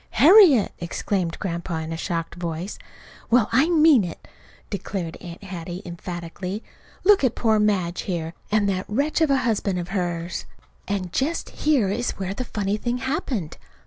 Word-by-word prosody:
"Harriet!" 310 - +7
exclaimed 170 0 -2
Grandpa 170 -2 -3
in 160 0 -4
a - - -3
shocked 165 0 -3
voice. 170 +2 -5 0.5
"Well, 235 -2 +4
I 270 +8 +4
mean 310 - +6
it!" 170 -3 -7 0.4
declared 185 -4 -4
Aunt 175 +1 -10
Hattie 180 0 -6
emphatically. 175 +3 -6 0.4
"Look 405 -4 +5
at 250 -3 +2
poor 220 -2 +2
Madge 190 -5 +1
here, 165 -3 -3 0.2
and 210 -1 +3
that 185 -2 -1
wretch 285 +9 0
of 320 - +4
a 275 - +4
husband 205 -5 0
of 175 0 -4
hers!" 175 -3 -2 0.4
And 190 -3 -3
just 310 +5 -1
here 275 -10 +2
is 235 +5 -1
where 190 0 -3
the 255 - -4
funny 205 -3 -2
thing 240 +3 -2
happened. 255 - -3
195 Hz, 160 wpm, -24 LUFS, 175-245 Hz, 0.5 s, Harriet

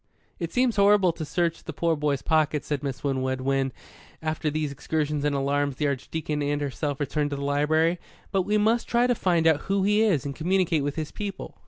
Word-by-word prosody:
"It 170 -1 -3
seems 250 -3 +1
horrible 200 -2 +5
to 165 - -6
search 170 +1 -1
the 160 - -6
poor 165 +2 +1
boy's 145 -2 -1
pockets," 155 -2 +1
said 145 -3 -2
Miss 135 -2 -5
Winwood, 130 -2 -1
when, 135 0 0 0.5
after 155 0 -2
these 150 -1 -2
excursions 150 +1 -2
and 145 -1 +1
alarms 140 0 0
the 150 - -1
Archdeacon 150 +2 -2
and 145 0 0
herself 145 0 -2
had - - -8
returned 145 +1 -1
to 145 - -3
the 140 - -5
library; 155 +4 +2 0.3
"but 195 -2 +2
we 210 +3 +1
must 220 +3 +2
try 240 +1 +3
to 250 - +3
find 175 -7 +1
out 160 -3 +5
who 195 0 +2
he 210 +2 +3
is 185 -11 +2
and 140 -1 -4
communicate 175 -2 +1
with 145 0 -2
his 155 -2 -4
people. 200 -2 -6
155 Hz, 215 wpm, -26 LUFS, 145-180 Hz, 0.5 s, horrible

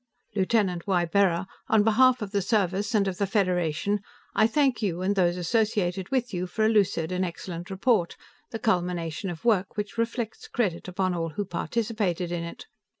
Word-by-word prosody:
"Lieutenant 195 -3 +1
Ybarra, 180 0 +2 0.2
on 220 -2 +4
behalf 245 +2 +4
of 200 - -6
the 200 -1 +1
Service 200 +1 0
and 200 -2 +3
of 190 -1 -3
the 200 - +1
Federation, 185 -1 +1 0.3
I 220 - +4
thank 265 -1 +2
you 185 -4 -1
and 200 +2 +1
those 175 -2 +2
associated 190 -1 0
with 250 -4 -1
you 180 0 -2
for 215 +4 0
a - - +4
lucid 195 -6 +2
and 185 +1 0
excellent 175 0 -5
report, 195 -2 +1 0.3
the 225 - -4
culmination 180 -4 -1
of 175 +4 -7
work 205 -3 +2
which 210 +2 -4
reflects 230 -1 -2
credit 190 -9 -1
upon 185 0 -1
all 165 -1 -2
who 205 +6 -3
participated 195 -2 -2
in 175 -1 -2
it. 170 - -8
195 Hz, 175 wpm, -26 LUFS, 175-220 Hz, 0.3 s, on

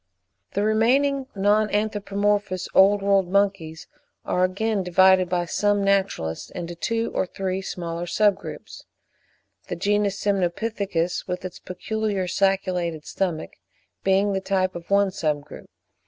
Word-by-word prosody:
The 200 - +1
remaining 260 +6 +2
non 205 +2 +2
anthropomorphous 205 -2 -1
Old 200 +1 +5
World 195 -2 +3
monkeys, 190 -5 0 0.4
are 180 - +1
again 200 +3 0
divided 185 0 +4
by 175 -1 0
some 205 +3 +1
naturalists 195 - 0
into 175 -1 -6
two 230 +6 -2
or 185 - 0
three 190 0 -3
smaller 170 -2 -5
sub 200 +3 +3
groups; - - -10 0.8
the - - -3
genus 205 -1 0
Semnopithecus, 195 -2 -1
with 180 0 -4
its 185 - -7
peculiar 205 +1 -3
sacculated 180 -4 0
stomach, 175 -5 -3 0.5
being 195 +1 +2
the 190 - -1
type 185 -1 0
of 175 0 -9
one 200 -1 +3
sub 150 -4 -1
group. 150 - -12
195 Hz, 130 wpm, -24 LUFS, 180-205 Hz, 0.8 s, Old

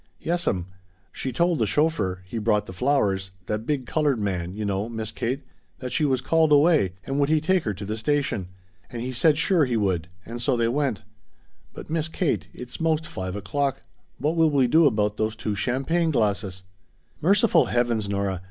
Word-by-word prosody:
"Yes'm. 165 - -1 0.5
She 130 - -4
told 170 +5 +1
the 110 - +2
chauffeur 100 - 0
he 115 +5 -4
brought 105 -1 +1
the 95 - -9
flowers 100 -5 +1 0.2
that 110 +3 -3
big 145 -4 -1
colored 145 -3 +1
man, 90 -4 -2
you 105 +2 -4
know, 100 +2 -1
Miss 110 -1 -4
Kate 125 +5 -3 0.3
that 125 - -6
she 155 - +1
was 130 -3 +1
called 160 +2 +3
away, 145 - +4
and 135 +1 -2
would 140 0 +2
he 155 0 +4
take 175 +1 +1
her 105 - 0
to 100 +2 -7
the 105 +2 -3
station. 110 -5 -1 0.4
And 120 -1 -5
he 130 - -3
said 145 +4 +3
sure 165 -2 +3
he 120 -3 0
would 95 -6 0 0.2
and 120 +1 -6
so 125 0 +1
they 115 -1 +2
went. 130 -5 -1 0.7
But, - - -10
Miss 160 -1 0
Kate 170 -1 -1
it's 125 0 -9
most 160 0 +1
five 95 - -5
o'clock 135 +7 -2 0.3
what 150 +4 0
will 165 -1 +4
we 140 -3 +3
do 155 +5 +5
about 105 -4 +1
those 110 0 -1
two 110 -1 -3
champagne 135 - 0
glasses!" 100 - 0 0.6
"Merciful 200 +7 +4
heavens, 120 -4 0
Nora! 100 -2 -1
125 Hz, 190 wpm, -25 LUFS, 105-150 Hz, 0.7 s, do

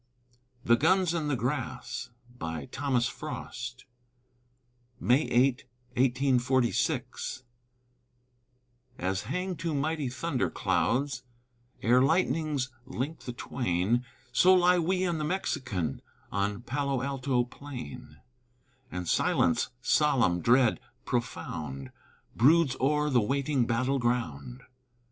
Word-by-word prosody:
THE 120 - +6
GUNS 180 +3 +3
IN 160 -3 -1
THE 145 - +1
GRASS 130 0 -3 0.3
[May 80 -2 -4
8, - - -11 2.9
1846] 125 +2 0 1.5
As 95 +2 -1
hang 180 - -3
two 165 -2 -3
mighty 150 -1 -1
thunderclouds 130 +1 0 0.6
Ere 125 +3 +5
lightnings 145 -2 +1 0.2
link 140 +6 -4
the 125 - -6
twain, 120 -1 0 0.3
So 185 +9 +6
lie 180 0 +5
we 185 +2 +1
and 170 -3 0
the - - -1
Mexican 135 - -2 0.3
On 100 +3 -1
Palo 135 0 -1
Alto 135 -2 0
plain; 125 -1 -9 0.7
And 90 -1 -4
silence, 85 - +2
solemn, 125 - +3
dread, 120 +4 +4 0.3
profound, 70 -5 -4 0.4
Broods 140 +3 +5
o'er 150 +2 +2
the 125 -3 +4
waiting 135 +2 0
battle 130 +4 +1
ground. 120 - -2
130 Hz, 95 wpm, -29 LUFS, 120-150 Hz, 2.9 s, THE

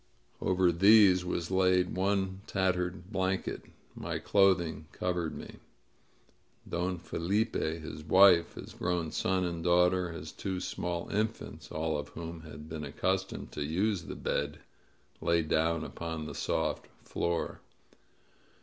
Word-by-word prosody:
Over 90 -1 +3
these 95 0 +6
was 90 -1 -3
laid 90 -1 +3
one 95 0 0
tattered 95 0 -1
blanket. 95 -1 -1 0.3
My - - -4
clothing 85 -6 +2
covered 90 -3 -2
me. - - -9 1.1
Don 90 +1 -1
FeUpe, 85 0 -1
his 75 -1 -7
wife, 90 +1 +6
his - - -9
grown 85 -2 -1
son 95 -1 0
and 85 -1 -3
daughter, 90 0 +3
his 80 -2 -7
two 95 -2 -4
small 85 -1 -3
infants, 110 +2 -3
all 80 -1 -1
of 75 - -5
whom 85 0 -7
had 75 -1 -10
been 80 -1 -6
accustomed 95 +6 -2
to 75 - -3
use 90 +4 0
the - - -6
bed, 75 +1 -2 0.6
lay 85 -1 +2
down 80 +1 +1
upon 80 -2 -5
the - - -6
soft - - -1 0.2
floor. 85 -1 -2
90 Hz, 130 wpm, -31 LUFS, 80-95 Hz, 1.1 s, these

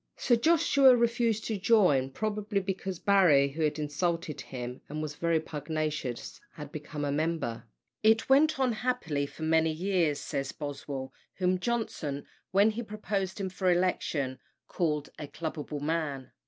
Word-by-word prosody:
Sir 240 - +3
Joshua 275 -1 +5
refused 230 -2 +1
to 215 -3 -2
join, 180 - +4
probably 210 +5 -2
because 190 -1 -4
Barry, 165 -9 +5
who 155 +4 -6
had 155 -1 +1
insulted 155 +1 -2
him, 125 -1 -7
and 150 +1 -4
was 155 -1 -3
very 165 +1 +1
pugnacious, 150 -4 -4
had 150 -2 -9
become 150 0 -5
a 140 - -1
member. 150 -6 -1 0.4
It 220 +1 +4
went 290 +2 +4
on 260 -2 +3
happily 215 - -1
for 160 - -9
many 160 0 +3
years, 170 -3 0
says 135 -1 -3
Boswell, 140 -2 -6 0.2
whom 185 0 +1
Johnson, 180 -11 -2 0.2
when 200 +4 +4
he 225 +2 -4
proposed 210 -3 -3
him 190 -1 -2
for 185 0 +1
election, 165 -7 0 0.3
called 150 -5 -1
"a 145 - -5
clubable 150 -2 -5
man." 145 -4 -2
165 Hz, 150 wpm, -29 LUFS, 145-205 Hz, 0.4 s, Joshua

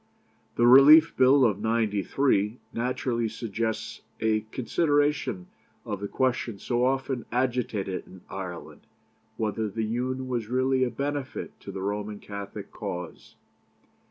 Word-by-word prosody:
"The 120 - +3
Relief 145 +6 +8
Bill 130 +1 +5
of 105 -4 +1
'93 110 +1 +1 0.2
naturally 120 -1 -1
suggests 110 0 -4 0.2
a 110 -1 +2
consideration 145 - 0 0.4
of 105 -2 -4
the 100 - -4
question 125 -3 -1
so 120 +4 -1
often 130 -1 0
agitated 120 -6 -1
in 95 -1 -14
Ireland, 90 -3 -8 0.5
whether 110 0 -1
the 110 +2 -2
Union 130 +3 -2
was 120 -4 -2
really 130 +2 +2
a 125 - +1
benefit 140 +2 -4
to 100 - -8
the 95 -1 -5
Roman 105 +1 -3
Catholic 100 -1 -8
cause. 90 -1 -7
115 Hz, 125 wpm, -27 LUFS, 105-130 Hz, 0.5 s, Relief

